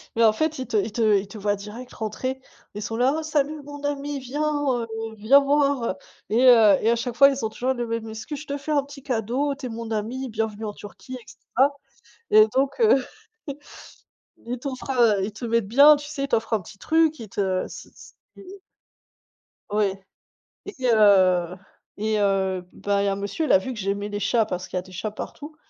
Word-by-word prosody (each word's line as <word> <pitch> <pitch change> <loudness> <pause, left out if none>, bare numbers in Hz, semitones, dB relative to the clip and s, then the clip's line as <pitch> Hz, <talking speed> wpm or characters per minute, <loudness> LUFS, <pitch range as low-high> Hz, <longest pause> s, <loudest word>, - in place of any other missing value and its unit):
Mais 230 - +3
en 220 - +7
fait, 315 +5 -1
ils 260 - -4
te 220 - 0
ils 210 +2 0
te 215 -2 +3
ils 195 +1 -3
te 200 - -10
voient 205 0 0
direct 210 +5 -10
rentrer, 255 +5 -4 0.4
ils 210 - -5
sont 225 - -4
là: 255 +4 +2
«Oh - - -5
salut 300 0 -1
mon 290 0 -10
ami, 285 0 -3
viens, 265 +3 -5 0.3
heu, 235 -2 -2 0.3
viens 230 +7 +6
voir». 280 -6 +1 0.3
Et 225 +3 +2
heu 225 -5 +7
et 225 - +2
à - - +3
chaque 235 0 -4
fois 275 +3 +7
ils 275 -3 -3
ont - - -1
toujours 255 +4 -1
la 240 -2 -3
même 230 -1 -4
excuse: 220 +7 -6
«Je 305 - -12
te 285 - -3
fais 285 +2 -6
un 290 -2 +2
petit 280 -1 -13
cadeau, 255 +3 -1
tu 275 -1 -9
es - - -4
mon 230 0 -6
ami, 235 +5 -3
bienvenue 220 -1 -3
en 210 - -4
Turquie 210 +5 -10
et - - -17
cetera». 270 +3 0 0.6
Et 215 0 +7
donc 270 - +1
heu, 430 - +4 1.4
ils 245 +2 -4
t'offrent 265 -1 -6
à 230 -6 +3
ils 200 +3 -2
te 220 +4 -7
mettent 230 -3 0
bien, 285 +6 +7
tu 290 0 -8
sais 290 -2 -4
ils - - -1
t'offrent 225 -5 -1
un 215 - +1
petit 190 +3 -14
truc, 320 +2 +2
ils 220 -3 -9
te 190 -2 -1
c'est - - -11
c'est - - -16 0.2
ils 390 +1 -12 1.1
Ouais 205 -2 0 0.7
et 405 - -8 0.2
heu 185 -5 +4 0.4
et 215 +1 0
heu, 190 -2 +1
bah 200 0 -1
il - - 0
y - - +1
a - - +2
un - - -3
monsieur, 200 +11 -3
il - - 0
a - - +8
vu 255 +7 -5
que 215 - -8
j'aimais 200 +1 -2
les 205 - -4
chats 220 +2 +2
parce 180 -2 -5
qu'il 185 - -3
y - - -7
des 185 - -16
chats 190 +4 -4
partout 295 +8 -8
230 Hz, 225 wpm, -24 LUFS, 205-275 Hz, 1.4 s, a